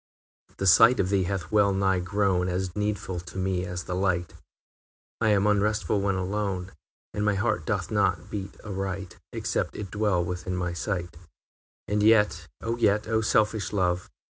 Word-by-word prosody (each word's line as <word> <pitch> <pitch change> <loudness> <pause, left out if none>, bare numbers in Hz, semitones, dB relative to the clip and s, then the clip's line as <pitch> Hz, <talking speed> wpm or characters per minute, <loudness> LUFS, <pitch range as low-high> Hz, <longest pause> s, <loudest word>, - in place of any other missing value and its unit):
II. - - -28
The 100 - -2
sight 115 +7 +7
of 95 - +1
thee 95 -2 +2
hath 95 0 -3
well 105 -2 +4
nigh 95 -1 +2
grown 95 0 +1
As 90 0 -2
needful 105 -3 -2
to 85 +2 -10
me 95 -1 -1
as 90 0 -4
the 90 - -5
light; 90 -2 0 0.9
I 110 - +3
am 100 -1 +3
unrestful 105 -1 +1
when 100 -1 +1
alone, 95 -1 -2 0.4
And 105 - -2
my 105 -1 +2
heart 100 -5 -1
doth - - -1
not - - 0
beat 100 -2 -6
aright 95 -2 -4
Except - - -2
it 100 -3 -6
dwell 100 -5 +1
within 90 +1 -4
thy 90 -1 -2
sight. 90 -2 -3
III. 80 - -16 0.7
And 105 0 +1
yet 105 -6 +4
and 115 +1 -3
yet 105 0 +3
O 110 0 +1
selfish 110 -1 +1
love! 90 -3 0
95 Hz, 175 wpm, -27 LUFS, 90-105 Hz, 0.9 s, sight